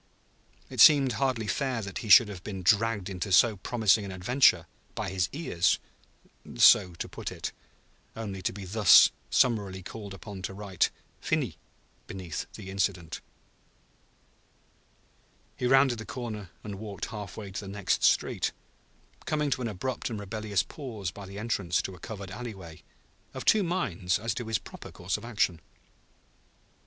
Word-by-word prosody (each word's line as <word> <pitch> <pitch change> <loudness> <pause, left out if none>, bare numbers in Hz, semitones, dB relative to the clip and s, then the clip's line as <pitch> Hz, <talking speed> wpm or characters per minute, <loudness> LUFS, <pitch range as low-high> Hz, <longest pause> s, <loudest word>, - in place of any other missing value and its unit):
It - - 0
seemed 140 -4 +8
hardly 125 -2 -1
fair 130 0 -1
that 100 -1 -5
he 110 - -7
should 110 +3 +9
have 95 -3 -8
been 95 -3 -6
dragged 105 +1 +2
into 95 0 -4
so 110 +3 +5
promising 110 0 +2
an 100 - -6
adventure, 95 -2 +3 0.3
by - - -3
his 95 -1 0
ears 95 - +1 0.8
(so 85 +8 +6
to - - -5
put - - -6
it), - - -5 0.6
only 100 -4 -5
to - - -1
be 100 0 -8
thus 100 0 +7 0.2
summarily 100 -6 +1
called 100 0 -8
upon 100 -1 -9
to 95 +1 -5
write 100 -3 0 0.3
"Finis" - - -1 0.5
beneath 90 -4 -6
the 95 - -8
incident. 95 -4 -2 2.3
He 125 - -1
rounded 135 -2 +4
the 115 - -7
corner 110 -6 -6
and 100 -2 -7
walked 105 -4 -5
half 105 -4 -7
way 100 -3 -7
to 95 - -4
the 100 - -8
next 100 -1 -1
street, - - +2 0.7
coming 150 -2 0
to 130 - 0
an 120 - -1
abrupt 115 +5 -3
and 110 -3 -4
rebellious 105 -1 -1
pause 110 - -6
by 100 +1 -10
the 100 +1 -9
entrance 100 -5 -1
to 95 - -5
a 90 - -13
covered 100 -4 -8
alleyway, 95 -8 -8 0.5
of - - -6
two 215 - +5
minds 100 - -1
as 115 +1 -2
to 120 0 -5
his 110 -1 +1
proper - - -11
course 90 +2 -3
of 105 - -6
action. 100 -8 0
105 Hz, 160 wpm, -28 LUFS, 95-115 Hz, 2.3 s, should